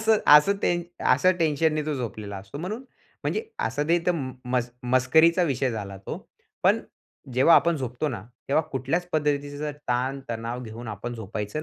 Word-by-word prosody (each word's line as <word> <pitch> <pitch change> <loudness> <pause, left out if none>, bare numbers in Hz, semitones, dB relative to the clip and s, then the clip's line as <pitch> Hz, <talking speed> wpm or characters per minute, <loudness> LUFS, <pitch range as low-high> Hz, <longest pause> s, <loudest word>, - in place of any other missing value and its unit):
असं 220 -1 +4 0.2
असं 150 +7 +5
ते - - +3 0.3
असं 160 +9 +5
टेन्शनने 155 -1 +2
तो 155 - 0
झोपलेला 110 -5 -5
असतो. 95 +7 -9
म्हणून 205 - -4 0.4
म्हणजे 440 - -1 0.2
असं 145 +1 -2
ते 170 +1 +4
तर 180 - +4
म 135 -6 -3 0.2
मस 125 -1 +1
मस्करीचा 130 +8 +4
विषय 135 -5 +1
झाला 100 -4 -5
तो. - - -6 0.4
पण - - +4 0.5
जेव्हा 135 +7 +6
आपण 170 -1 +4
झोपतो 130 +2 -2
ना, 120 -8 -4 0.3
तेव्हा 155 +4 +3
कुठल्याच 140 +7 -1
पद्धतीचा 145 -1 -1 0.2
ताणतणाव 125 -1 -2
घेऊन 115 +1 -8
आपण 110 +3 -5
झोपायचं 110 +5 -4
135 Hz, 160 wpm, -26 LUFS, 120-160 Hz, 0.5 s, जेव्हा